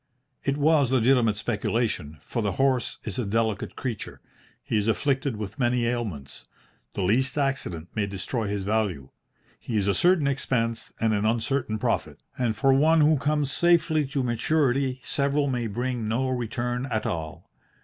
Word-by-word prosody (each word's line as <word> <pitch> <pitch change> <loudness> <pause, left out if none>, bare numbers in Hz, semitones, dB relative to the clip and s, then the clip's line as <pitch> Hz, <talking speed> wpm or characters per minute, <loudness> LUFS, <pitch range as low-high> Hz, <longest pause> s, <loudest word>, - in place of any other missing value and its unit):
It 140 0 0
was 145 -3 +3
legitimate 120 -4 +3
speculation, 105 -7 -1
for 115 - -3
the 100 -3 -1
horse 130 +2 +1
is 105 0 -5
a - - +1
delicate 110 -1 -1
creature, 120 -6 -5 0.4
he - - -3
is 105 0 +1
afflicted 135 +2 0
with 105 +4 -6
many 120 -1 +2
ailments, 110 - -4 0.5
the 100 - -1
least 125 +10 +1
accident 135 - -2
may 105 -2 -1
destroy 100 +4 -3
his 100 -1 -2
value, 100 -10 -1 0.5
he 115 - -3
is 100 -1 +1
a 100 - +3
certain 175 - +3
expense 115 -4 -1
and 110 -1 +2
an 105 0 0
uncertain 115 0 0
profit, - - -2
and 120 -3 0
for 135 +5 +3
one 155 +4 +4
who 150 +1 +5
comes 145 0 0
safely 165 -4 +3
to 135 -1 -1
maturity 130 +1 +1
several 140 +1 +1
may 125 -3 -1
bring 120 +1 -2
no 125 +4 0
return 125 +1 -2
at 110 -4 -2
all. 80 -3 -5
120 Hz, 160 wpm, -26 LUFS, 105-135 Hz, 0.5 s, who